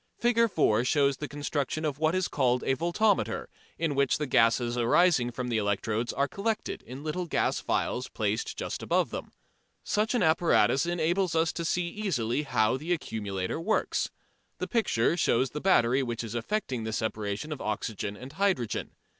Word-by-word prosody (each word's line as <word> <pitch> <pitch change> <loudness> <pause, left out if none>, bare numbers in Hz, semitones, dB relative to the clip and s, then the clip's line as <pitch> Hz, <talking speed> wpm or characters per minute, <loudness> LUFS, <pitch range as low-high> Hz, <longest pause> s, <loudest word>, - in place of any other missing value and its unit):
Fig. 230 -1 +3
4 115 - +2
shows 140 +1 +2
the 150 - -4
construction 145 +1 -2
of 145 -2 -2
what 160 +2 +2
is 185 -1 +1
called 125 -3 +1
a 135 - +1
voltameter, 180 - +1 0.3
in 165 -3 0
which 140 -1 +2
the 150 - -2
gases 120 -1 +3
arising 125 +2 +3
from 125 +1 -4
the 115 -2 +1
electrodes 105 +3 -1
are 140 - 0
collected 215 +5 -3
in 130 +3 -8
little 175 +3 -3
glass - - 0
vessels - - -1
placed 440 -1 -2
just - - -4
above - - +1
them. - - -6 0.5
Such 215 +3 0
an 230 - +2
apparatus 160 -2 +3
enables 175 +1 0
us 165 +1 +2
to 170 - -3
see 175 +1 0
easily 150 - -1
how 120 -4 +1
the 160 +6 -1
accumulator 100 - -3
works. 215 +5 0 0.5
The - - -2
picture 180 - +1
shows 130 -6 +2
the 150 - -5
battery 130 -8 +4
which 120 -2 -3
is 115 -1 -6
effecting 125 - -2
the 110 0 -3
separation 105 +5 -3
of 150 - -4
the - - -6
oxygen 105 -1 -3
and 130 +3 -10
hydrogen. 180 - -1
145 Hz, 175 wpm, -28 LUFS, 120-175 Hz, 0.5 s, battery